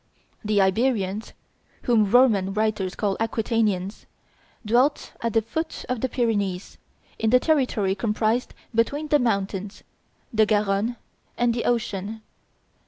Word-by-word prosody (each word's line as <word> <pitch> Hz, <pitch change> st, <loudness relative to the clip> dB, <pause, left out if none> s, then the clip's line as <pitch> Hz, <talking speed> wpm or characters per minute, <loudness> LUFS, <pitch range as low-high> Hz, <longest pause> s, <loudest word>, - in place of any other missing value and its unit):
The 210 Hz, -1 st, +1 dB
Iberians, 205 Hz, 0 st, 0 dB, 0.5 s
whom 220 Hz, -4 st, +3 dB
Roman 205 Hz, -5 st, +4 dB
writers 210 Hz, -3 st, 0 dB
call 200 Hz, -2 st, 0 dB
Aquitanians, 220 Hz, -4 st, -1 dB, 0.6 s
dwelt 250 Hz, +7 st, +2 dB
at 230 Hz, -2 st, -1 dB
the 225 Hz, -, +3 dB
foot 320 Hz, +9 st, -4 dB
of 250 Hz, -3 st, -2 dB
the 260 Hz, -, 0 dB
Pyrenees, 205 Hz, -7 st, -1 dB, 0.4 s
in 220 Hz, -, +1 dB
the 250 Hz, +2 st, +6 dB
territory 250 Hz, -11 st, +1 dB
comprised 220 Hz, +3 st, -1 dB, 0.2 s
between 285 Hz, +7 st, 0 dB
the 295 Hz, -, +4 dB
mountains, 200 Hz, -4 st, -2 dB, 0.5 s
the 220 Hz, -1 st, +4 dB
Garonne, 210 Hz, +2 st, +1 dB, 0.4 s
and 240 Hz, -1 st, +2 dB
the 235 Hz, -, -3 dB
ocean. 220 Hz, -2 st, -2 dB
220 Hz, 120 wpm, -24 LUFS, 200-240 Hz, 0.6 s, the